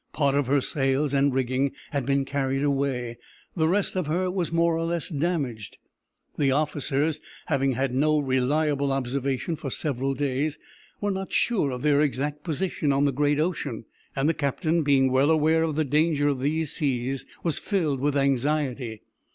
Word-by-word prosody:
Part 140 Hz, -2 st, +2 dB
of 140 Hz, -2 st, +1 dB
her 140 Hz, +1 st, +3 dB
sails 135 Hz, +1 st, 0 dB
and 140 Hz, 0 st, +3 dB
rigging 130 Hz, +1 st, 0 dB, 0.2 s
had 140 Hz, -4 st, -2 dB
been 140 Hz, 0 st, +2 dB
carried 135 Hz, 0 st, -1 dB
away; 135 Hz, -4 st, -1 dB, 0.4 s
the 160 Hz, -3 st, +2 dB
rest 195 Hz, +4 st, +1 dB
of 185 Hz, -5 st, -1 dB
her 180 Hz, +4 st, 0 dB
was 180 Hz, -3 st, -2 dB
more 170 Hz, 0 st, +2 dB
or 165 Hz, -, -1 dB
less 170 Hz, -1 st, -1 dB
damaged. 140 Hz, -, -2 dB, 0.6 s
The 140 Hz, -2 st, +3 dB
officers, 150 Hz, +1 st, 0 dB, 0.3 s
having 135 Hz, -3 st, +1 dB
had 130 Hz, 0 st, -1 dB
no 150 Hz, +3 st, +3 dB
reliable 140 Hz, +1 st, +1 dB
observation 135 Hz, +4 st, -1 dB
for 145 Hz, -, -5 dB
several 135 Hz, 0 st, -2 dB
days, 145 Hz, +2 st, -1 dB, 0.4 s
were 205 Hz, -1 st, 0 dB
not 190 Hz, 0 st, -4 dB
sure 215 Hz, -12 st, +1 dB
of 125 Hz, 0 st, -5 dB
their 145 Hz, -1 st, +4 dB
exact 145 Hz, +1 st, -1 dB
position 165 Hz, -2 st, -1 dB
on 140 Hz, +1 st, +2 dB
the 140 Hz, -, +3 dB
great 145 Hz, +2 st, +1 dB
ocean, 155 Hz, -9 st, -2 dB, 0.3 s
and 135 Hz, +2 st, +1 dB
the 165 Hz, -, +3 dB
captain, 155 Hz, +3 st, 0 dB
being 135 Hz, -3 st, +3 dB
well 135 Hz, +3 st, +3 dB
aware 160 Hz, +1 st, +3 dB
of 160 Hz, -2 st, 0 dB
the 155 Hz, 0 st, +1 dB
danger 145 Hz, +1 st, +2 dB
of 140 Hz, -3 st, -1 dB
those 150 Hz, +3 st, 0 dB
seas, 135 Hz, -2 st, -2 dB, 0.2 s
was 165 Hz, -3 st, 0 dB
filled 160 Hz, -10 st, 0 dB
with 145 Hz, +1 st, +1 dB
anxiety. 135 Hz, -4 st, 0 dB
145 Hz, 175 wpm, -26 LUFS, 135-155 Hz, 0.6 s, their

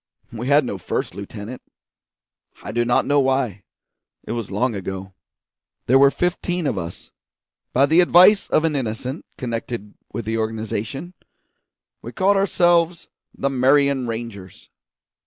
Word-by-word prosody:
We 120 Hz, +2 st, -5 dB
had 145 Hz, 0 st, +4 dB
no 100 Hz, -5 st, -4 dB
first -, -, -3 dB
lieutenant; 105 Hz, +5 st, -8 dB, 1.0 s
I 100 Hz, -, -5 dB
do 120 Hz, +2 st, +1 dB
not 120 Hz, +1 st, +2 dB
know 145 Hz, 0 st, +3 dB
why; 130 Hz, -7 st, 0 dB, 0.6 s
it -, -, -7 dB
was 115 Hz, -4 st, -4 dB
long 115 Hz, +6 st, 0 dB
ago. 95 Hz, -1 st, -6 dB, 0.7 s
There 130 Hz, +2 st, +5 dB
were 140 Hz, 0 st, +7 dB
fifteen 180 Hz, +1 st, -2 dB
of 140 Hz, -, 0 dB
us. 85 Hz, -2 st, -7 dB, 0.6 s
By 135 Hz, +2 st, +4 dB
the 160 Hz, +5 st, +5 dB
advice 180 Hz, +4 st, +6 dB
of 155 Hz, -, +2 dB
an 155 Hz, -2 st, 0 dB
innocent 125 Hz, +3 st, -4 dB
connected 115 Hz, -3 st, -5 dB, 0.2 s
with 115 Hz, -, -5 dB
the 115 Hz, +1 st, -1 dB
organisation, 110 Hz, -, -4 dB, 0.9 s
we -, -, -8 dB
called 195 Hz, +1 st, +3 dB
ourselves 175 Hz, -3 st, +2 dB, 0.3 s
the 140 Hz, -, -1 dB
Marion 135 Hz, 0 st, +3 dB
Rangers. 110 Hz, -5 st, -7 dB
125 Hz, 140 wpm, -22 LUFS, 110-145 Hz, 1.0 s, were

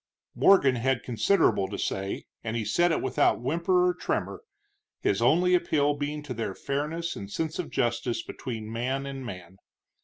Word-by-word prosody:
Morgan 140 Hz, -10 st, +5 dB
had 125 Hz, +1 st, 0 dB
considerable 120 Hz, -, +2 dB
to -, -, -6 dB
say, 95 Hz, 0 st, -3 dB, 0.2 s
and 115 Hz, 0 st, -2 dB
he 110 Hz, -, -2 dB
said 175 Hz, +8 st, +2 dB
it -, -, 0 dB
without 130 Hz, -1 st, +2 dB
whimper 170 Hz, +7 st, +2 dB
or 180 Hz, -, +2 dB
tremor, 180 Hz, -, -3 dB, 0.6 s
his -, -, 0 dB
only 180 Hz, +3 st, +4 dB
appeal 155 Hz, -5 st, +2 dB
being 145 Hz, +1 st, -4 dB
to 140 Hz, -3 st, -5 dB
their 110 Hz, -5 st, -4 dB
fairness 155 Hz, +5 st, -3 dB
and 100 Hz, -1 st, -7 dB
sense 160 Hz, -, -3 dB
of 175 Hz, -, -3 dB
justice 120 Hz, -1 st, -1 dB
between 110 Hz, -3 st, -6 dB
man 130 Hz, +4 st, -2 dB
and 135 Hz, -1 st, -6 dB
man. 95 Hz, -5 st, -9 dB
135 Hz, 165 wpm, -27 LUFS, 115-160 Hz, 0.6 s, Morgan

